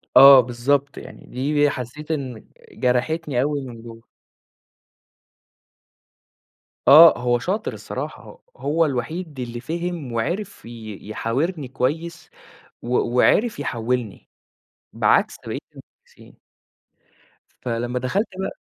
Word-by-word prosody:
آه 135 +1 +10
بالضبط، 130 +4 0
يعني - - -11
دي 145 +3 +1
حسّيت 140 +5 -6
إن 130 -7 -4 0.3
جرَحتني 125 +2 0
أوي 145 +1 -1
من 120 -4 -9
جوّه. 115 0 -13 2.8
آه 160 +3 +9
هو 120 0 +1
شاطر 195 - -2
الصراحة، - - -8 0.2
هو 160 +3 +1
الوحيد 150 +3 -4
اللي 120 -1 -5
فهِم 170 -1 -4
وعرِف 180 - -3
ي 110 -3 -9
يحاورني 135 - -2
كويس 160 +7 -3 0.5
و 125 +1 0 0.2
وعرِف 215 - +3
يحولّني 120 -4 -3 0.6
بعكس - - +2
بقيت - - -4
المدرسين. - - -19 1.2
فلمّا 120 +1 -2
دخَلت 185 - 0
بقى 190 - -4
135 Hz, 100 wpm, -22 LUFS, 120-160 Hz, 2.8 s, آه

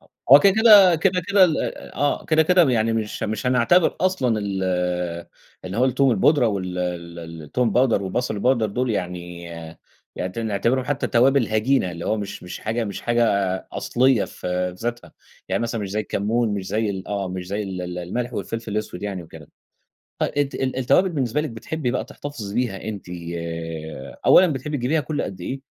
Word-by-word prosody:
آه - - -26 0.2
هو 140 - +11
كده 200 -1 +5
كده، 200 -6 +8
كده 180 +3 +1
كده 200 -1 +6
ال 165 -4 +1 0.4
آه، 145 0 0
كده 160 0 +3
كده 175 -3 +4
يعني 115 -2 +1
مش 110 -2 -3
مش 110 +3 -2
هنعتبر 130 +8 +3
أصلًا 135 -12 +1
ال 100 -2 -3 1.0
اللي 90 +2 -5
هو 125 - +3
التوم 130 +1 +3
البودرة 135 +1 +3
وال 90 -3 -3
ال 85 -1 -4
ال 80 -1 -8
التوم 120 +11 0
الباودر، 120 -2 +2
وبصل 110 +4 -2
الباودر 115 +1 +2
دول 125 +4 -2
يعني 90 -3 -4 0.7
يعني 90 0 -3
ت - - -7
نعتبرهم 115 +4 0
حتّى 145 0 -1
توابل 130 +1 +3
هجينة، 110 -2 +1
اللي 85 0 -7
هو 110 - +1
مش 100 -2 -6
مش 90 - -7
حاجة 115 +2 -2
مش 100 -2 -5
حاجة 120 0 +2 0.5
أصليّة 130 -2 +2
في 90 0 -3
ذاتها، 120 +1 -5 0.4
يعني - - 0
مثلًا 115 -1 -2
مش 100 -2 -4
زي 105 - -1
الكمون، 110 +3 0
مش 95 -2 -4
زي 110 -1 0
ال 95 -1 -6
آه، 100 -2 -2
مش 90 -1 -5
زي 100 +3 -2
ال 95 -2 -5
ال 90 0 -5
الملح 120 +8 -3
والفلفل 115 -2 -4
الأسود 105 -3 -4
يعني 100 -3 -4
وكده. 80 -2 -13 0.7
ط - - -3
أنتِ 145 -1 0
ال 130 -1 -2
التوابل 130 +9 +3
بالنسبة 145 -3 -1
لِك 155 - -3
بتحبي 125 +4 -3
بقى 125 -3 -2
تحتفظي 135 -7 -7
بيها 120 -6 -1
أنتِ 105 -4 -6 1.2
أولًا 185 - +8
بتحبي 150 0 -3
تجيبيها 140 +5 +1
كل 150 +1 -3
قدّ 95 -2 -6
إيه؟ 135 +9 -4
115 Hz, 185 wpm, -22 LUFS, 95-135 Hz, 1.2 s, هو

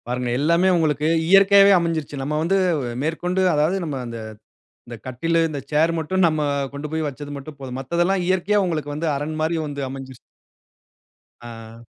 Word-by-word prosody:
பாருங்க 125 0 -2
எல்லாமே 170 +6 +2
உங்களுக்கு 155 -3 +1 0.2
இயற்கையாவே 195 +1 +7
அமஞ்சிருச்சு. 165 -3 -3
நம்ம 145 +3 -2
வந்து 180 +4 +1 0.5
மேற்கொண்டு, 180 +4 -1
அதாவது 155 +6 +1
நம்ம 150 -3 -4
அந்த 115 -1 -7 0.7
அந்த 120 - -7
கட்டிலு, 165 +7 -1
இந்த 150 -3 -5
சேர் 155 +2 +3
மட்டும் 180 +4 0
நம்ம 155 -2 0 0.3
கொண்டு 140 +2 -5
போயி 160 0 -1
வச்சது 145 +1 -7
மட்டும் 140 +1 -9
போதும். 130 -2 -6
மத்ததெல்லாம் 175 +7 0
இயற்கையா 190 +3 +2
உங்களுக்கு 155 -4 -3
வந்து, 155 +3 -3
அரண் 150 +3 -4
மாரி 160 +2 0
வந்து 145 -1 -5
அமஞ்சிருச்சு. 130 -1 -8 1.2
ஆ. 115 -1 -11
155 Hz, 155 wpm, -22 LUFS, 140-170 Hz, 1.2 s, இயற்கையாவே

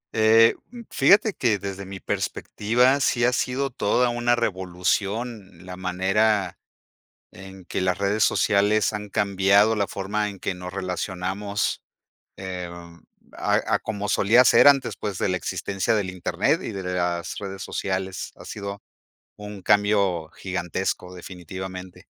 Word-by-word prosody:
Eh, 110 +1 +6 0.2
mm, 240 0 -10
fíjate 210 +1 +4
que, 115 - +1
desde 100 0 -6
mi 95 0 -7
perspectiva, 125 +6 +1
sí 120 -3 +1
ha 125 - +2
sido 130 +3 -1
toda 120 +2 +1
una 120 0 +1
revolución 95 0 -2
la 90 0 -7
manera 95 +2 0 0.7
en 95 -1 -12
que - - -2
las 90 -1 0
redes 100 +2 +1
sociales 105 +1 +2
han 105 -1 -5
cambiado 100 +2 +3
la 100 -1 +1
forma 105 +3 -2
en 100 - -11
que 95 - -3
nos 90 0 -8
relacionamos, 95 +2 -3 0.6
em, 85 -2 -8 0.3
a - - +1
a - - +3
como 105 -2 -4
solía 115 +6 +4
ser - - +6
antes, 140 -2 +4
pues, 100 -3 -4
de - - 0
la 90 - 0
existencia 95 +5 -1
del 100 -3 -1
Internet 90 -2 0
y - - -5
de 95 -1 -6
la 90 0 -3 0.2
las 85 - -6
redes 95 -1 -6
sociales. 95 -1 -3
Ha - - -13
sido 100 -1 -7 0.5
un 105 -1 -9
cambio 100 -5 +2
gigantesco 90 0 -3
definitivamente. 90 +1 -8
100 Hz, 145 wpm, -24 LUFS, 95-110 Hz, 0.7 s, Eh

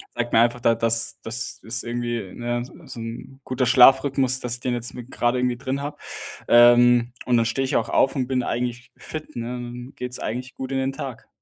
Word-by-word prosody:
sagt 120 0 -2
mir 115 - +6
einfach 120 +1 +2
da 115 0 +3
das 115 0 +1
das 110 0 -4
ist 115 +3 -2
irgendwie, 120 -4 -3
ne, 120 0 -2
s 125 - -9 0.2
so - - -8
'n 115 +4 -8
guter 130 0 0
Schlafrhythmus, 130 +1 +5
dass 120 -1 -2
ich 120 - -8
den 125 - -1
jetzt 120 0 -3
mit 125 +1 -9
gerade 120 +1 +1
irgendwie 125 -1 0
drin 135 +2 -3
habe, 145 +1 -5 0.5
ähm, 120 0 +6
und 125 -1 +3
dann 115 - +2
stehe 125 +4 0
ich 130 - -2
auch - - -1
auf 135 - +2
und 130 -3 -1
bin 130 -1 0
eigentlich 125 +1 -3
fit, 155 -1 -8
ne, 115 -1 -4
dann 120 +1 -7
geht's 125 0 -5
eigentlich 125 +3 -5
gut 130 0 -6
in 135 - 0
den 135 +1 -1
Tag. 135 -3 -7
120 Hz, 220 wpm, -23 LUFS, 120-130 Hz, 0.5 s, mir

